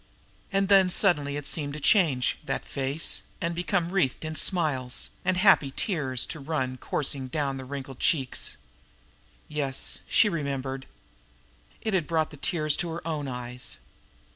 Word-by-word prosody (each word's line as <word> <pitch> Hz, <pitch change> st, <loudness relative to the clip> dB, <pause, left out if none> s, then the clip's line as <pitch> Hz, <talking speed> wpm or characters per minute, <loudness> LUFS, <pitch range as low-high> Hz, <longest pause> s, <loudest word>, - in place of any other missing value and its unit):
And 195 Hz, 0 st, +2 dB
then 195 Hz, -2 st, +6 dB
suddenly 150 Hz, -7 st, +3 dB
it 145 Hz, -, -5 dB
seemed 145 Hz, -3 st, 0 dB
to 150 Hz, -, -5 dB
change, 150 Hz, -, +3 dB
that -, -, -3 dB
face, 140 Hz, +3 st, 0 dB, 0.2 s
and 170 Hz, -1 st, -1 dB
become 175 Hz, 0 st, -1 dB
wreathed 165 Hz, -6 st, 0 dB
in 155 Hz, -, -3 dB
smiles, 150 Hz, -7 st, 0 dB
and 185 Hz, 0 st, +1 dB
happy 180 Hz, -7 st, +5 dB
tears 140 Hz, -, +1 dB
to 160 Hz, -, -6 dB
run 135 Hz, -3 st, -2 dB
coursing 135 Hz, 0 st, -1 dB
down 140 Hz, 0 st, -2 dB
the 130 Hz, -, -7 dB
wrinkled 135 Hz, -1 st, -7 dB
cheeks. 135 Hz, -6 st, +1 dB, 0.9 s
Yes, 140 Hz, -3 st, -2 dB
she 220 Hz, -, +5 dB
remembered! 135 Hz, -6 st, -3 dB, 0.9 s
It 220 Hz, -2 st, -2 dB
had 175 Hz, -5 st, +1 dB
brought 160 Hz, -2 st, 0 dB
the 150 Hz, -, -11 dB
tears 155 Hz, -1 st, +1 dB
to 175 Hz, -, -2 dB
her 165 Hz, 0 st, -6 dB
own 150 Hz, -3 st, -2 dB
eyes. 125 Hz, 0 st, -5 dB
150 Hz, 150 wpm, -27 LUFS, 135-170 Hz, 0.9 s, then